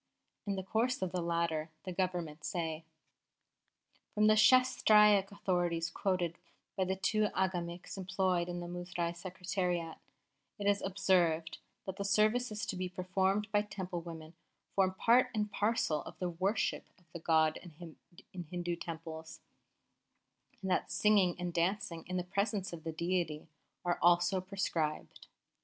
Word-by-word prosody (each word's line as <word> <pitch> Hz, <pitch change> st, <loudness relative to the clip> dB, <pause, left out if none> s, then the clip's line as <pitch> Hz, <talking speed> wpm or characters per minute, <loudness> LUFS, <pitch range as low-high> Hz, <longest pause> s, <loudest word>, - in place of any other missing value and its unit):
In 200 Hz, -, 0 dB
the 190 Hz, -, -3 dB
course 225 Hz, +3 st, 0 dB
of 185 Hz, -, -2 dB
the 180 Hz, -1 st, -1 dB
latter 170 Hz, -2 st, -1 dB
the 185 Hz, -, -5 dB
Government 175 Hz, -4 st, -2 dB
say: 160 Hz, -2 st, -3 dB, 1.3 s
"'From 210 Hz, 0 st, +4 dB
the 215 Hz, 0 st, +6 dB
Shastraic 210 Hz, -5 st, +6 dB
authorities 175 Hz, -4 st, 0 dB
quoted 175 Hz, -3 st, -1 dB, 0.4 s
by 190 Hz, -, +1 dB
the 190 Hz, +1 st, 0 dB
two 210 Hz, +2 st, +1 dB
Agamiks 180 Hz, 0 st, -2 dB
employed 185 Hz, -2 st, 0 dB
in 175 Hz, 0 st, -4 dB
the 175 Hz, -, -5 dB
Muzrai 175 Hz, -1 st, -3 dB
Secretariat, 180 Hz, -2 st, -3 dB, 0.6 s
it 205 Hz, -, -5 dB
is 200 Hz, 0 st, +3 dB
observed 180 Hz, -4 st, +1 dB, 0.3 s
that 190 Hz, 0 st, -5 dB
the 200 Hz, -, -2 dB
services 215 Hz, +2 st, +2 dB
to -, -, -3 dB
be 185 Hz, 0 st, -3 dB
performed 190 Hz, +3 st, 0 dB
by 205 Hz, -1 st, +4 dB
Temple 185 Hz, -4 st, -5 dB
women 165 Hz, -1 st, -9 dB, 0.4 s
form 190 Hz, -1 st, +2 dB
part 240 Hz, +5 st, +4 dB
and 210 Hz, -1 st, -1 dB
parcel 205 Hz, -9 st, +1 dB
of -, -, -10 dB
the 180 Hz, -, -2 dB
worship 190 Hz, +6 st, 0 dB
of 180 Hz, -, -27 dB
the 170 Hz, -, -5 dB
god 160 Hz, -1 st, +3 dB, 0.8 s
in 180 Hz, -1 st, -5 dB
Hindu 175 Hz, -1 st, -2 dB
Temples, 160 Hz, -1 st, -7 dB, 1.2 s
and 190 Hz, -, -1 dB
that -, -, +1 dB
singing 200 Hz, -4 st, +4 dB
and 175 Hz, -1 st, -3 dB
dancing 175 Hz, 0 st, -1 dB
in 185 Hz, 0 st, -2 dB
the 180 Hz, -, -1 dB
presence 200 Hz, +1 st, -1 dB
of 160 Hz, -2 st, -8 dB
the 165 Hz, -, -3 dB
deity 165 Hz, -2 st, -2 dB, 0.4 s
are 175 Hz, 0 st, 0 dB
also 175 Hz, +2 st, +4 dB
prescribed. 180 Hz, -5 st, -3 dB
180 Hz, 145 wpm, -33 LUFS, 170-200 Hz, 1.3 s, the